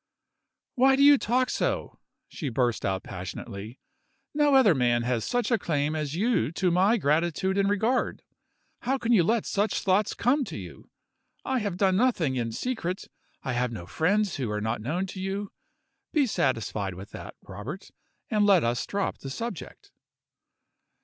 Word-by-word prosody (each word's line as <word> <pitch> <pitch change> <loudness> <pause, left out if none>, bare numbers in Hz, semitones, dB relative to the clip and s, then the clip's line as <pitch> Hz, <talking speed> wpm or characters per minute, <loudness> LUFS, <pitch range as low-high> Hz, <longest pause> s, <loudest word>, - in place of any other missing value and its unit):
"Why 265 +1 +5
do 275 - +3
you 285 -1 +8
talk 250 +3 +1
so?" - - -2 0.3
she 150 - -5
burst 120 -1 0
out 95 0 -1
passionately. 100 +5 -7 0.5
"No 295 -1 +3
other 240 -9 +6
man 120 -3 +2
has 120 -2 0
such 245 - -1
a 230 - +3
claim 150 -1 -1
as 150 -1 -3
you 200 - +1
to 180 0 +1
my 190 +7 +4
gratitude 170 +3 +1
and 200 0 +2
regard. 220 +5 0 0.6
How 265 +3 0
can 235 -2 -1
you 220 -6 +6
let 225 +5 +1
such 205 +2 0
thoughts 195 +2 +1
come 270 +5 +2
to - - -7
you? 85 -8 -10 0.6
I 265 -1 0
have 205 -5 -3
done 190 -1 +3
nothing 190 - +2
in 115 -2 -2
secret. 190 - -3 0.3
I 125 - -2
have 125 0 0
no 100 -7 -7
friends 195 - +1
who 130 -5 -2
are 105 0 -2
not 110 +2 -2
known 165 - -1
to 190 0 -7
you. 195 +1 -3 0.6
Be 295 -3 +3
satisfied 110 - -1
with 95 +3 -10
that, - - -9
Robert 145 - -8 0.4
and 210 -1 +3
let 195 -5 +5
us 120 0 0
drop 200 -1 -2
the 135 - -7
subject." 185 - -7
185 Hz, 170 wpm, -27 LUFS, -, 0.6 s, you